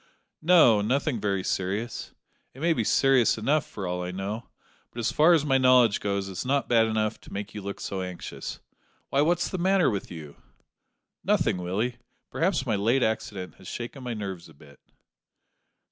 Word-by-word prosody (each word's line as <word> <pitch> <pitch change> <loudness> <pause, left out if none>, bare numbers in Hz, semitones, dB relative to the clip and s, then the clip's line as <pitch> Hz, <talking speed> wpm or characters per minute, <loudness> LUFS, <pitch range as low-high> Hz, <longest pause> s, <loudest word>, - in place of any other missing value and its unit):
"No, 155 -11 +6
nothing 125 +2 0
very 100 -2 0
serious. 100 +7 -3 0.4
It - - -12
may 170 0 +4
be 120 - -1
serious 130 0 +3
enough 140 +7 +1
for 100 - -6
all 90 0 -2
I 90 - -4
know; 100 +5 -5 0.4
but - - -17
as 115 - 0
far 160 +3 +5
as 155 -3 +3
my 135 -2 +3
knowledge 125 -4 +5
goes 100 -1 -2
it's 95 -2 -5
not 140 +2 0
bad 115 -2 +4
enough 110 0 -1
to - - -15
make 100 +1 -6
you 105 - -6
look 100 +1 -6
so 95 -1 -4
anxious. 90 -1 -6 0.5
Why, 140 - +2
what's 170 +3 +2
the 185 - -4
matter 185 -4 +3
with 100 -2 -4
you?" 80 -4 -10 0.9
"Nothing, - - +2
Willie. 100 +8 -2 0.3
Perhaps 165 -5 0
my 115 -4 0
late 115 +6 +2
accident 100 -4 -3
has - - -13
shaken 120 +3 -6
my 120 -2 -4
nerves 95 -5 -6
a 80 - -17
bit." 70 0 -18
110 Hz, 180 wpm, -26 LUFS, 95-135 Hz, 0.9 s, No